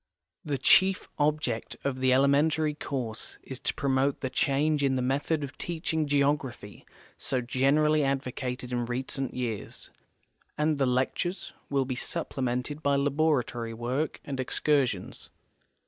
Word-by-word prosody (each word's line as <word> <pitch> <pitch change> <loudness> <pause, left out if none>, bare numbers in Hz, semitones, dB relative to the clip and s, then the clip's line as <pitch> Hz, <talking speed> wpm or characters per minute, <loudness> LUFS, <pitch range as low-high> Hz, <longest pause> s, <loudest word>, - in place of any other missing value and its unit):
The 145 -3 -1
chief 190 +8 +4
object 145 -6 0
of 135 -2 -1
the 130 0 +3
elementary 150 +3 +3
course 125 -7 -4
is 130 -1 -7
to - - -1
promote 135 0 +1
the 130 -2 -2
change 145 +2 +2
in 135 -1 +2
the 130 - 0
method 145 +4 0
of 140 -1 -7
teaching 160 -2 -1
geography 140 -7 -1 0.3
so 130 - -1
generally 145 +5 +3
advocated 130 -2 -2
in 120 -1 0
recent 130 +2 -3
j'ears, 120 -5 -5 0.7
and 150 -1 +1
the 135 - +3
lectures 135 +9 -1 0.2
will 140 -2 +1
be 130 - -2
supplemented 130 0 -3
by 140 -1 +2
laboratory 140 -5 +1
work 125 +7 -2
and 135 -2 -4
excursions. 130 -6 0
135 Hz, 130 wpm, -28 LUFS, 125-150 Hz, 0.7 s, chief